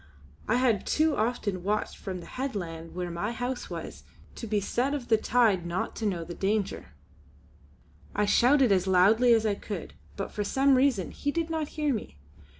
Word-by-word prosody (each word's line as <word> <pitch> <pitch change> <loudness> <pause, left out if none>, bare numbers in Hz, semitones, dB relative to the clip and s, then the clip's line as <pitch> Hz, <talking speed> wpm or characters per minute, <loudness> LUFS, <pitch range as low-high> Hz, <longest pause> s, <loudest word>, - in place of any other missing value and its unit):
I 220 - +2
had 245 -5 +2
too 310 0 +2
often 215 -4 -1
watched 210 +3 -1
from 185 -3 -6
the - - -11
headland 175 -12 -5
where 180 -1 -3
my 200 +7 -3
home 245 +2 -2
was - - -7 0.3
to 230 - -7
be 210 -1 +1
the 200 - -5
set 270 +7 0
of 265 -4 -6
the 220 - +5
tide 220 -6 +2
not 170 +1 -3
to 220 - -1
know 175 -4 -2
the 175 +1 -7
danger. 200 +2 -2 1.2
I 210 - +2
shouted 250 +4 +4
as 190 -1 +2
loudly 205 +7 +5
as 225 -1 +4
I 210 - +2
could, 200 -2 -6 0.2
but 195 - -4
for 210 - -2
some 270 +6 +3
reason 255 - +2
he 285 - -2
did 330 +1 -2
not 315 -2 -1
hear 300 -2 +1
me. 210 - -6
215 Hz, 190 wpm, -28 LUFS, 190-255 Hz, 1.2 s, the